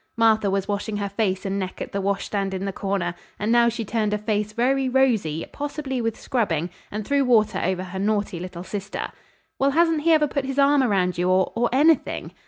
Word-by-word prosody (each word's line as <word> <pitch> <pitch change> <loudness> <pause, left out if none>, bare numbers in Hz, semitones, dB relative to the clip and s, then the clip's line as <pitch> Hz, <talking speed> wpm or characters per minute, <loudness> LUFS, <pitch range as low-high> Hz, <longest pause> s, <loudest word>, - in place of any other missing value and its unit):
Martha 220 -3 +4
was 195 0 -1
washing 205 +1 -2
her 200 -1 -2
face 195 -2 -1
and 195 0 -1
neck 185 -1 -5
at - - -5
the 200 - -2
washstand 195 0 -1
in 190 +1 -3
the 195 - -3
corner, 195 -3 -2 0.2
and 210 +2 -1
now 235 0 +5
she 230 -1 -4
turned 215 -1 0
a - - -1
face 210 0 -1
very 260 +4 +1
rosy, 225 - +1
possibly 285 -3 -4
with 225 -1 -2
scrubbing, 180 - -1 0.2
and 210 0 -5
threw 280 +2 +2
water 215 -6 +3
over 185 +1 -1
her 190 +1 -6
naughty 205 -3 0
little 180 -1 -7
sister. 200 +1 -5 0.5
"Well, 275 - +3
hasn't 325 +1 +2
he 330 +2 +3
ever 310 -2 +5
put 280 -1 -2
his 270 0 -4
arm 280 0 +5
around 190 -7 +1
you 180 +1 +1
or 185 0 +2
or 235 +1 +1
anything?" 295 +3 +2
210 Hz, 210 wpm, -24 LUFS, 195-260 Hz, 0.5 s, now